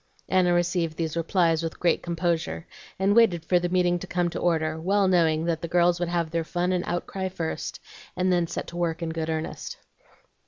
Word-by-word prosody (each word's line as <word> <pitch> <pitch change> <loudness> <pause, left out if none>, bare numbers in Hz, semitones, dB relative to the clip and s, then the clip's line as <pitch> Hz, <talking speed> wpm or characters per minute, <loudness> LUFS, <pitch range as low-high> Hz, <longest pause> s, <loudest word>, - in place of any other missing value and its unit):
Anna 185 -1 +3
received 175 -2 0
these 160 -2 -2
replies 165 -1 +2
with 165 -1 -5
great 175 - +2
composure, 170 -1 -2 0.3
and 195 +2 +2
waited 180 -8 +4
for 180 +1 +3
the 175 0 -2
meeting 175 -1 +2
to - - -8
come 175 -1 0
to - - -4
order, 160 -2 0
well 195 +3 +2
knowing 165 -3 +3
that 165 -1 -1
the 170 - -3
girls 175 0 +3
would 175 -1 -1
have 170 -2 -1
their 165 -1 0
fun 175 +2 -1
and 180 -1 0
outcry 190 +2 -3
first, 165 -3 -4 0.4
and 185 0 +2
then 175 -1 +2
set 170 - -4
to 170 - -8
work 170 -1 -1
in 165 - -2
good 160 0 -3
earnest. 160 0 -4
175 Hz, 205 wpm, -26 LUFS, 165-180 Hz, 0.4 s, waited